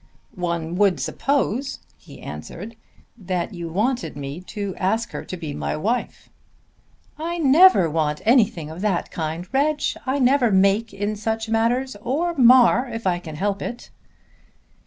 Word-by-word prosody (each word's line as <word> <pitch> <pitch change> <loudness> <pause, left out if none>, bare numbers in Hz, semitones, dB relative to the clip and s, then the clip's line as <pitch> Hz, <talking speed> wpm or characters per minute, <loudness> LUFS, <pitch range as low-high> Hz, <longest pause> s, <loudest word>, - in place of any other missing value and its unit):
"One 170 -2 -3
would 200 -2 +3
suppose," 275 -1 -1 0.2
he - - -15
answered, 225 +3 -8 0.4
"that 185 -2 -3
you 170 -2 -6
wanted 225 - -1
me 140 +4 -6
to 200 -3 -4
ask 220 +5 -1
her - - -6
to 185 - -7
be 155 -4 -6
my - - -3
wife." 230 +10 -2 0.9
"I 340 +2 -3
never 310 - +6
want 150 -1 -1
anything 210 - +2
of 165 +3 -8
that 200 -4 -1
kind, 165 +2 -4
Reg. 295 +2 +2 0.3
I 265 +2 +1
never 260 -2 +3
make 200 +3 +3
in 205 +2 -3
such 220 +1 -3
matters, 235 +3 +1
or 310 +9 -1
mar 250 -2 +5
if 225 -2 -6
I 175 -2 +1
can 160 -3 -9
help 200 +4 -2
it." 240 - -6
215 Hz, 150 wpm, -22 LUFS, 175-250 Hz, 0.9 s, never